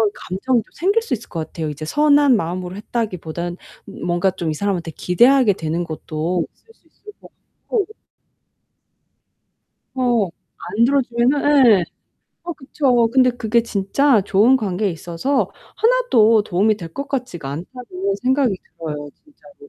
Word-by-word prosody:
감정도 230 Hz, +6 st, -1 dB
생길 400 Hz, +8 st, +1 dB
수 -, -, -3 dB
있을 235 Hz, -1 st, -5 dB
것 160 Hz, -2 st, -4 dB
같아요. 160 Hz, -2 st, -5 dB
이제 150 Hz, +1 st, -6 dB
선한 290 Hz, -, +4 dB
마음으로 180 Hz, -1 st, -3 dB
했다기 210 Hz, -2 st, -3 dB
보단 170 Hz, +2 st, -5 dB, 0.3 s
음 -, -, -8 dB
뭔가 175 Hz, +2 st, +1 dB
좀 170 Hz, -2 st, -4 dB
이 155 Hz, -, -1 dB
사람한테 180 Hz, -2 st, -2 dB
기대하게 235 Hz, -, +4 dB
되는 165 Hz, 0 st, -3 dB
것도 165 Hz, +1 st, -3 dB
있을 450 Hz, -, -24 dB
수 325 Hz, -, -34 dB
있을 420 Hz, +6 st, -15 dB
것 -, -, -14 dB, 0.4 s
같고 425 Hz, -6 st, 0 dB, 2.1 s
어 240 Hz, -7 st, +1 dB, 0.5 s
안 230 Hz, -, +5 dB
들어 275 Hz, +2 st, +3 dB
주면은 250 Hz, -1 st, +4 dB
예. 175 Hz, -, -2 dB, 0.6 s
아 350 Hz, -, -4 dB
그쵸. 260 Hz, -4 st, +1 dB
근데 255 Hz, -1 st, +5 dB
그게 235 Hz, -1 st, 0 dB
진짜 225 Hz, +4 st, +2 dB
'좋은 215 Hz, +7 st, +4 dB
관계에 205 Hz, -2 st, -1 dB
있어서 175 Hz, -, -2 dB, 0.3 s
하나도 255 Hz, -, +4 dB
도움이 205 Hz, +4 st, +1 dB
될 165 Hz, -4 st, -9 dB
것 280 Hz, -, -5 dB
같지가 240 Hz, -, -4 dB
않다.'는 195 Hz, -, -5 dB
생각이 260 Hz, -5 st, +2 dB, 0.2 s
들어요 150 Hz, -3 st, -5 dB, 0.2 s
진짜로. 300 Hz, +6 st, -19 dB
220 Hz, 300 characters per minute, -20 LUFS, 175-265 Hz, 2.1 s, 안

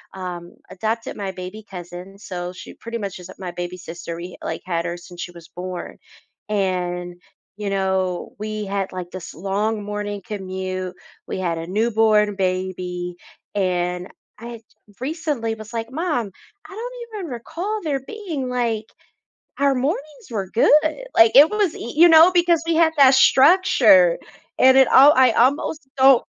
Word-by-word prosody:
um, 175 Hz, -2 st, -7 dB, 0.2 s
adopted 225 Hz, +4 st, -3 dB
my 195 Hz, -2 st, -4 dB
baby 185 Hz, +4 st, -8 dB
cousin, 180 Hz, +1 st, -9 dB
so 180 Hz, -3 st, -6 dB
she 185 Hz, +6 st, -11 dB
pretty 230 Hz, 0 st, -6 dB
much 195 Hz, -3 st, -5 dB
is, 180 Hz, 0 st, -11 dB
uh, -, -, -9 dB
my 180 Hz, -2 st, -5 dB
baby 175 Hz, +1 st, -5 dB
sister. 170 Hz, -1 st, -7 dB
We 175 Hz, +1 st, -8 dB
h -, -, -12 dB
like -, -, -4 dB
had 170 Hz, -2 st, -2 dB
her 170 Hz, 0 st, -3 dB
since 175 Hz, 0 st, -11 dB
she 175 Hz, -, -6 dB
was 170 Hz, -1 st, -14 dB
born. 180 Hz, 0 st, -7 dB, 0.5 s
And, 180 Hz, -3 st, -2 dB, 0.4 s
you 210 Hz, -1 st, -3 dB
know, 190 Hz, -2 st, -1 dB
we 215 Hz, 0 st, -4 dB
had, 195 Hz, -1 st, -3 dB
like, 180 Hz, -1 st, -6 dB
this 185 Hz, -2 st, -8 dB
long 205 Hz, +3 st, -2 dB
morning 205 Hz, 0 st, -4 dB
commute. 185 Hz, -2 st, -5 dB, 0.3 s
We -, -, -4 dB
had 170 Hz, -3 st, -1 dB
a 165 Hz, -, -6 dB
newborn 215 Hz, 0 st, +2 dB
baby. 185 Hz, -1 st, -3 dB, 0.4 s
And 180 Hz, -2 st, -1 dB, 0.3 s
I 230 Hz, -, -10 dB
y 235 Hz, -2 st, -8 dB, 0.4 s
recently 280 Hz, -6 st, -2 dB
was 215 Hz, +1 st, -11 dB
like, 230 Hz, +1 st, -4 dB
"Mom, 270 Hz, -, -2 dB, 0.4 s
I -, -, -15 dB
don't 485 Hz, +3 st, -6 dB, 0.3 s
even 330 Hz, -7 st, -6 dB
recall 355 Hz, -, -4 dB
there 290 Hz, -4 st, -1 dB
being, 350 Hz, -12 st, -5 dB
like, 235 Hz, -3 st, -1 dB, 0.7 s
our 280 Hz, -1 st, +3 dB
mornings 285 Hz, +2 st, -3 dB
were 195 Hz, -5 st, -4 dB
good." 305 Hz, -, +3 dB
Like, 225 Hz, 0 st, +6 dB
it 290 Hz, +3 st, +9 dB
was 415 Hz, -5 st, +1 dB
y 235 Hz, -, -7 dB
you 340 Hz, +3 st, +8 dB
know, 325 Hz, +2 st, +8 dB
because 345 Hz, -2 st, +3 dB
we 335 Hz, -, +1 dB
had 325 Hz, -1 st, +4 dB
that 270 Hz, -1 st, +7 dB
structure 260 Hz, -, +5 dB, 0.4 s
and 260 Hz, 0 st, +6 dB
it 265 Hz, -, +6 dB
all 280 Hz, +3 st, +8 dB
I 260 Hz, -1 st, +6 dB
almost 270 Hz, +4 st, +1 dB
don't. 265 Hz, -1 st, +6 dB
210 Hz, 165 wpm, -21 LUFS, 185-265 Hz, 0.7 s, it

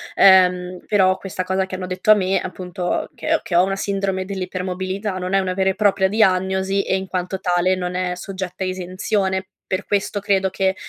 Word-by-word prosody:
ehm, 180 Hz, -1 st, +5 dB
però 190 Hz, -2 st, +3 dB
questa 185 Hz, -1 st, -4 dB
cosa 190 Hz, +1 st, 0 dB
che 190 Hz, -, -6 dB
hanno 185 Hz, 0 st, -5 dB
detto 185 Hz, +3 st, +2 dB
a -, -, +9 dB
me, 195 Hz, -1 st, +1 dB
appunto, 180 Hz, 0 st, -3 dB
che -, -, -1 dB
ho -, -, 0 dB
che 175 Hz, -, -4 dB
ho 175 Hz, -, +6 dB
una 195 Hz, +1 st, -1 dB
sindrome 195 Hz, -1 st, -1 dB
dell'ipermobilità, 190 Hz, +1 st, -3 dB
non 180 Hz, +1 st, -4 dB
è 195 Hz, -, +5 dB
una 185 Hz, -1 st, -1 dB
vera 190 Hz, +1 st, +1 dB
e 190 Hz, -, -1 dB
propria 200 Hz, -2 st, +2 dB
diagnosi 190 Hz, -1 st, +2 dB
e 190 Hz, -, 0 dB
in 190 Hz, 0 st, -5 dB
quanto 185 Hz, +1 st, -3 dB
tale 180 Hz, 0 st, +2 dB
non 180 Hz, -1 st, -4 dB
è 180 Hz, -1 st, -1 dB
soggetta 185 Hz, 0 st, -5 dB
a -, -, -1 dB
esenzione. 190 Hz, +1 st, -2 dB, 0.2 s
Per 190 Hz, +1 st, -3 dB
questo 205 Hz, 0 st, -1 dB
credo 195 Hz, -1 st, +1 dB
che 190 Hz, 0 st, 0 dB
190 Hz, 205 wpm, -21 LUFS, 185-195 Hz, 0.2 s, a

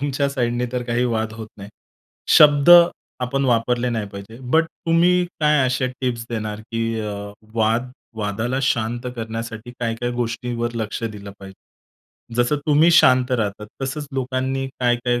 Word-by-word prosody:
तुमच्या 140 Hz, 0 st, 0 dB
साईडने 120 Hz, -2 st, -1 dB
तर 125 Hz, -1 st, -1 dB
काही 120 Hz, +1 st, 0 dB
वाद 110 Hz, -2 st, -1 dB
होत 110 Hz, -1 st, -8 dB
नाही. 100 Hz, 0 st, -10 dB, 0.7 s
शब्द 145 Hz, +1 st, +6 dB, 0.5 s
आपण 135 Hz, +2 st, -1 dB
वापरले 120 Hz, 0 st, +1 dB
नाही 110 Hz, -3 st, -2 dB
पाहिजे, 100 Hz, +3 st, -10 dB
बट 160 Hz, +6 st, +2 dB
तुम्ही 175 Hz, +2 st, +2 dB, 0.2 s
काय 150 Hz, -3 st, +3 dB
असे 130 Hz, 0 st, 0 dB
टिप्स 120 Hz, -3 st, -2 dB
देणार 110 Hz, -2 st, -4 dB
की 115 Hz, 0 st, -3 dB
अ, 105 Hz, -1 st, -4 dB, 0.4 s
वाद 115 Hz, +3 st, +1 dB, 0.3 s
वादाला 110 Hz, +5 st, -2 dB
शांत 120 Hz, -1 st, -1 dB
करण्यासाठी 115 Hz, +1 st, -6 dB
काय-काय 115 Hz, +1 st, -2 dB
गोष्टींवर 120 Hz, 0 st, -3 dB
लक्ष 110 Hz, 0 st, -4 dB
दिलं 105 Hz, -2 st, -6 dB
पाहिजे? 95 Hz, -1 st, -13 dB, 0.7 s
जसं 120 Hz, +4 st, +2 dB
तुम्ही 155 Hz, +3 st, +5 dB
शांत 130 Hz, -5 st, +5 dB
राहतात 105 Hz, -3 st, -2 dB, 0.2 s
तसंच 145 Hz, +2 st, -3 dB
लोकांनी 130 Hz, +1 st, -2 dB
काय-काय 120 Hz, 0 st, +1 dB
120 Hz, 140 wpm, -21 LUFS, 115-130 Hz, 0.7 s, शब्द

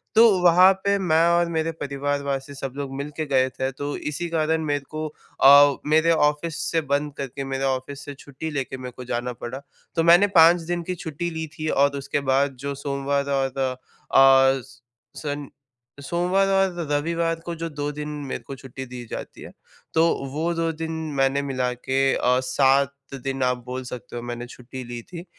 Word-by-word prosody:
तो 230 Hz, +2 st, +8 dB, 0.2 s
वहाँ 180 Hz, +2 st, +7 dB
पे 200 Hz, 0 st, +2 dB
मैं 165 Hz, -3 st, +3 dB
और 170 Hz, 0 st, +2 dB
मेरे 165 Hz, 0 st, -1 dB
परिवार 145 Hz, -2 st, -3 dB
वासी 140 Hz, 0 st, -3 dB
सब 135 Hz, -1 st, -5 dB
लोग 140 Hz, -2 st, -4 dB
मिलके 150 Hz, +3 st, -4 dB
गए 130 Hz, -2 st, +2 dB
थे, 130 Hz, +1 st, -3 dB
तो 145 Hz, +2 st, -4 dB
इसी 150 Hz, +4 st, -4 dB
कारण 160 Hz, 0 st, +1 dB
मेरे 145 Hz, -2 st, -1 dB
को 155 Hz, 0 st, -4 dB, 0.4 s
अ, 140 Hz, +1 st, +8 dB
मेरे 160 Hz, +2 st, +4 dB
ऑफ़िस 150 Hz, 0 st, +1 dB
से 165 Hz, -, +2 dB
बंद 145 Hz, 0 st, 0 dB
करके, 135 Hz, 0 st, -5 dB
मेरे 135 Hz, 0 st, -3 dB
ऑफ़िस 135 Hz, +2 st, -2 dB
से 145 Hz, -, -6 dB
छुट्टी 140 Hz, +3 st, -7 dB
लेके 135 Hz, -2 st, -3 dB
मेरे 130 Hz, -1 st, -7 dB
को 125 Hz, -, -7 dB
जाना 125 Hz, +1 st, -2 dB
पड़ा। 125 Hz, +3 st, -7 dB, 0.3 s
तो 165 Hz, -, +2 dB
मैंने 175 Hz, +4 st, +7 dB
5 165 Hz, +2 st, +7 dB
दिन 175 Hz, +1 st, -3 dB
की 180 Hz, +2 st, -3 dB
छुट्टी 160 Hz, +2 st, -3 dB
ली 160 Hz, -1 st, -4 dB
थी 155 Hz, -, -2 dB
और 140 Hz, 0 st, +2 dB
उसके 140 Hz, +1 st, -2 dB
बाद 135 Hz, 0 st, +2 dB
जो 140 Hz, 0 st, -2 dB
सोमवार 140 Hz, 0 st, -1 dB
और 135 Hz, 0 st, -2 dB
अ, 135 Hz, +1 st, +3 dB
स 130 Hz, +1 st, -18 dB, 0.4 s
सन 145 Hz, -2 st, -4 dB, 0.5 s
सोमवार 180 Hz, +6 st, +1 dB
और 190 Hz, -4 st, +1 dB
रविवार 165 Hz, +3 st, 0 dB
को 170 Hz, -, -3 dB
जो 165 Hz, 0 st, -4 dB
2 145 Hz, -1 st, -3 dB
दिन 150 Hz, 0 st, -6 dB, 0.2 s
मेरे -, -, -5 dB
को 135 Hz, -, -8 dB
छुट्टी 130 Hz, 0 st, -9 dB
दी 125 Hz, -1 st, -8 dB
जाती -, -, -7 dB
है, -, -, -10 dB, 0.4 s
तो 160 Hz, -, +4 dB, 0.3 s
वो 165 Hz, +3 st, -1 dB
2 165 Hz, 0 st, 0 dB
दिन 160 Hz, +1 st, -5 dB, 0.3 s
मैंने 135 Hz, +1 st, +2 dB
मिला 130 Hz, -3 st, -1 dB
के 130 Hz, +2 st, -3 dB, 0.2 s
अ, 125 Hz, +1 st, +2 dB
7 135 Hz, +1 st, +3 dB, 0.3 s
दिन 135 Hz, -1 st, -2 dB
आप 125 Hz, 0 st, +1 dB
बोल 130 Hz, +1 st, -5 dB
सकते 125 Hz, -1 st, -8 dB
हो 120 Hz, -, -4 dB
मैंने 120 Hz, 0 st, -5 dB
छुट्टी 125 Hz, +1 st, -9 dB
ली 120 Hz, 0 st, -7 dB
थी। 175 Hz, +4 st, -9 dB
140 Hz, 190 wpm, -24 LUFS, 135-160 Hz, 0.5 s, तो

